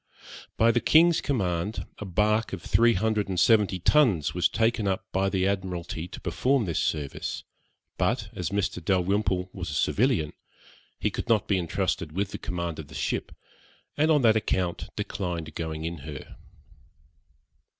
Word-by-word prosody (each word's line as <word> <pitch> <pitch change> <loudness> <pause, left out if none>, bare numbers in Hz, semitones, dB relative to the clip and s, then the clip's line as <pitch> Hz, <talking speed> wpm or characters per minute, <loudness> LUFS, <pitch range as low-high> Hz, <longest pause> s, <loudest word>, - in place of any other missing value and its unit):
By 115 +1 +5
the 120 - +2
king's 165 +1 +5
command, 100 -6 -1
a 105 - -5
bark 105 +4 +1
of 95 -2 -5
three 115 0 +4
hundred 105 0 0
and 90 -2 -1
seventy 105 -4 +4
tons 90 - +3
was 90 0 +2
taken 115 -2 +1
up 95 -1 -1
by 95 +1 +1
the 95 -1 0
Admiralty 90 -4 -3
to - - -9
perform 130 -3 +1
this 85 -4 -1
service, 75 -3 -2 0.6
but, 105 +4 0
as 90 - -3
Mr. 100 -3 -2
Dalrymple 95 0 +1
was 90 -3 -5
a 75 - -4
civilian, 100 - +1 0.7
he - - 0
could - - -5
not 110 -4 +3
be 100 -2 +2
entrusted 90 -2 -2
with 100 +2 -2
the - - -6
command 85 -3 -4
of 75 - -7
the - - -12
ship, - - -2 0.6
and 155 +2 +2
on 150 -4 +4
that 110 -1 +5
account 95 -5 -1
declined 85 -5 -4
going 80 -1 -4
in 85 -1 -4
her. 70 0 -9
95 Hz, 160 wpm, -27 LUFS, 85-110 Hz, 0.7 s, By